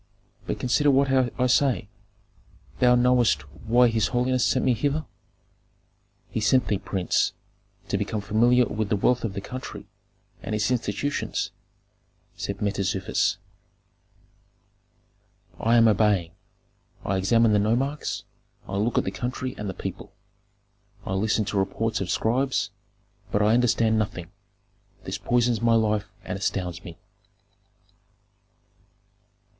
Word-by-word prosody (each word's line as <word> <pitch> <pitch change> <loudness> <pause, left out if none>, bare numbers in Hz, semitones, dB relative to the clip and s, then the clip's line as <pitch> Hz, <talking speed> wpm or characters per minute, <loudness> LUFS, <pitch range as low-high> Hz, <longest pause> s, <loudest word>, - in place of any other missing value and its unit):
But - - -3
consider 145 +4 +2
what 135 0 +3
I 125 -1 +1
say 125 -3 +2 0.9
Thou 125 -1 +5
knowest 120 - +3
why 120 - +3
his 115 -2 +1
holiness 125 0 +1
sent 130 - +1
me 130 - +4
hither." 145 +6 -1 1.3
"He - - -2
sent 115 +4 +3
thee, 105 - +1
prince, 95 -4 0 0.5
to - - -1
become 110 - -2
familiar 120 +4 +3
with 110 -1 -3
the 105 - +2
wealth 125 +5 +1
of 110 -4 -2
the 100 - -4
country 130 +5 -7 0.6
and 110 - -3
its 105 +3 0
institutions," 125 +4 -2 0.8
said 100 +1 -4
Mentezufis. 95 -3 0 2.2
"I 115 +1 +3
am 115 -1 +6
obeying. 105 -5 +2 0.7
I 95 - 0
examine 110 +4 +3
the 105 - +4
nomarchs, 130 +8 -1 0.4
I 95 - -3
look 110 +4 0
at - - +3
the - - -3
country 125 +1 -4
and 105 -1 -5
the 95 - -5
people. - - -7 0.9
I 95 - -3
listen 105 +2 +1
to 100 - -1
reports 110 +4 -1
of 95 - -3
scribes, 120 -3 0 0.6
but 105 - +2
I 105 +1 +4
understand 115 -2 +3
nothing; 90 -5 -4 0.7
this - - -5
poisons 120 -2 +1
my 115 -1 +4
life 105 -2 +1
and 95 - -5
astounds 90 -3 -2
me. 85 -1 -10
110 Hz, 130 wpm, -25 LUFS, 100-125 Hz, 2.2 s, am